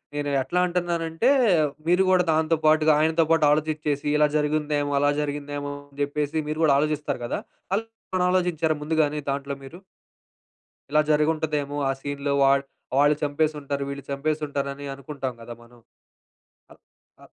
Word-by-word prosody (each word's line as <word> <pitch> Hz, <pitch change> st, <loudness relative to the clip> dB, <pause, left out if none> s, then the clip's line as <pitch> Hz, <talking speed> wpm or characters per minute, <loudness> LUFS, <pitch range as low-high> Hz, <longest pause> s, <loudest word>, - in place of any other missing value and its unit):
నేను 145 Hz, 0 st, -2 dB
ఎట్లా 130 Hz, +7 st, -1 dB
అంటున్నానంటే, 175 Hz, +3 st, 0 dB, 0.6 s
మీరు 180 Hz, +2 st, +4 dB
గూడా 185 Hz, -1 st, +4 dB
దానితో 160 Hz, +1 st, +2 dB
పాటుగా, 155 Hz, 0 st, +5 dB
ఆయనతో 160 Hz, +1 st, +3 dB
పాటు 165 Hz, -2 st, +4 dB
ఆలోచించేసి 150 Hz, -1 st, -1 dB
ఇలా 150 Hz, 0 st, +5 dB
జరిగిందేమో! 150 Hz, -1 st, 0 dB
అలా 145 Hz, +1 st, +3 dB
జరిగిందేమో! 145 Hz, 0 st, -4 dB, 0.2 s
అని 140 Hz, -, -17 dB
చెప్పేసి 150 Hz, +2 st, -2 dB
మీరు 155 Hz, +1 st, -2 dB
గూడా 145 Hz, -3 st, +5 dB
ఆలోచిస్తారు 150 Hz, -4 st, -1 dB
గదా! -, -, -2 dB, 0.4 s
అలా! 220 Hz, +3 st, -2 dB, 0.5 s
ఆలోచించారా 170 Hz, -4 st, +1 dB
ముందుగానీ 150 Hz, -1 st, +1 dB
దాంట్లో 140 Hz, 0 st, -2 dB
మీరు? 135 Hz, +6 st, -10 dB, 1.1 s
ఇలా 150 Hz, +1 st, +4 dB
జరిగుంటదేమో! 150 Hz, -1 st, 0 dB
ఆ -, -, +3 dB
సీన్‌లో 140 Hz, 0 st, -2 dB
వాళ్ 135 Hz, 0 st, +4 dB, 0.3 s
వాళ్ళు 145 Hz, +1 st, +5 dB
చంపేసి 150 Hz, +2 st, 0 dB
ఉంటారు, 140 Hz, 0 st, -3 dB
వీళ్ళు 140 Hz, 0 st, -6 dB
చంపేసి 150 Hz, +3 st, -1 dB
ఉంటారని 140 Hz, 0 st, -4 dB
అనుకుంటాం 135 Hz, -1 st, -5 dB
గదా! 120 Hz, +1 st, -8 dB
మనం. 120 Hz, +1 st, -19 dB, 0.9 s
అల్ -, -, -18 dB, 0.4 s
అ -, -, -14 dB
150 Hz, 140 wpm, -24 LUFS, 140-155 Hz, 1.1 s, పాటుగా